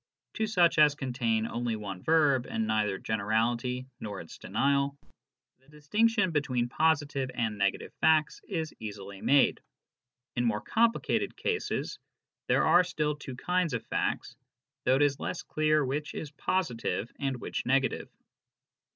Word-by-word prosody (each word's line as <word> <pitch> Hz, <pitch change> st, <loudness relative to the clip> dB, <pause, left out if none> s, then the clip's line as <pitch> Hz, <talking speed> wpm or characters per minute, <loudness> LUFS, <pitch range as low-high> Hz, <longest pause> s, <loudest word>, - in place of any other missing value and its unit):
to 220 Hz, -, -1 dB
such 175 Hz, -6 st, +3 dB
as 150 Hz, -1 st, +6 dB
contain 120 Hz, -5 st, -1 dB
only 115 Hz, 0 st, -2 dB
one 100 Hz, -4 st, -6 dB
verb 150 Hz, -6 st, +3 dB
and 110 Hz, -, -1 dB
neither 110 Hz, -3 st, +1 dB
generality 115 Hz, +5 st, 0 dB
nor'* 100 Hz, -3 st, -5 dB
its 80 Hz, -, -11 dB
denial, 140 Hz, +6 st, +1 dB, 0.6 s
the 135 Hz, -, -30 dB
distinction 200 Hz, +7 st, +1 dB
between 130 Hz, -6 st, 0 dB
positive 145 Hz, -1 st, +1 dB
and 110 Hz, -3 st, -1 dB
negative 100 Hz, -1 st, -1 dB
facts 155 Hz, -1 st, +3 dB
is 160 Hz, -5 st, -3 dB
easily 100 Hz, -2 st, -8 dB
made. 140 Hz, 0 st, +4 dB, 0.7 s
In 120 Hz, -, +1 dB
more 115 Hz, -3 st, +1 dB
complicated 230 Hz, +1 st, +1 dB
cases 440 Hz, -1 st, -2 dB, 0.5 s
there -, -, +3 dB
are 175 Hz, +3 st, +6 dB
still 150 Hz, -4 st, -1 dB
two 140 Hz, -3 st, -8 dB
kinds 180 Hz, 0 st, 0 dB
of 115 Hz, -, -5 dB
facts, 125 Hz, -, -2 dB, 0.5 s
though 130 Hz, -, +4 dB
it 140 Hz, -, +3 dB
is 140 Hz, -1 st, +1 dB
less -, -, -4 dB
clear 155 Hz, -1 st, +2 dB
which 145 Hz, +3 st, -3 dB
is 150 Hz, -, -5 dB
positive 140 Hz, -, -2 dB
and 135 Hz, -3 st, -2 dB
which -, -, -4 dB
negative. 135 Hz, 0 st, +1 dB
135 Hz, 140 wpm, -29 LUFS, 115-155 Hz, 0.7 s, as